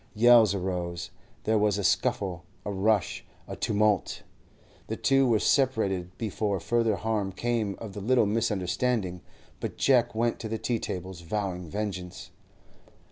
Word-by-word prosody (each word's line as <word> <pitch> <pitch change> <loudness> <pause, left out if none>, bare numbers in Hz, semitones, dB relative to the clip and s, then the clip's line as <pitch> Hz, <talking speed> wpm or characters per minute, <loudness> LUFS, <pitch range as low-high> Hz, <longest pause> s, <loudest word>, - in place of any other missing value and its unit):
Yells 115 -2 +6
arose; 90 -2 -3 0.3
there 110 0 +2
was 105 -1 +2
a 100 - -2
scuffle, 90 +1 0 0.2
a 105 - -2
rush, 100 +1 +1 0.2
a - - -6
tumult. 105 -2 +1 0.6
The - - -3
two 135 -1 +3
were 115 -2 +4
separated 100 -9 +1
before 105 -3 -1
further 115 +1 +1
harm 105 -2 -1
came 110 0 -1
of 110 -4 -8
the 105 - -6
little 120 +2 +3
misunderstanding, 105 -2 0 0.4
but - - -5
Jack 125 -5 +3
went 115 +1 0
to 110 - -5
the 110 - -2
tea 115 0 -1
tables 90 -2 -5
vowing 90 -1 -3
vengeance. 95 -2 -5
105 Hz, 140 wpm, -28 LUFS, 95-115 Hz, 0.6 s, Yells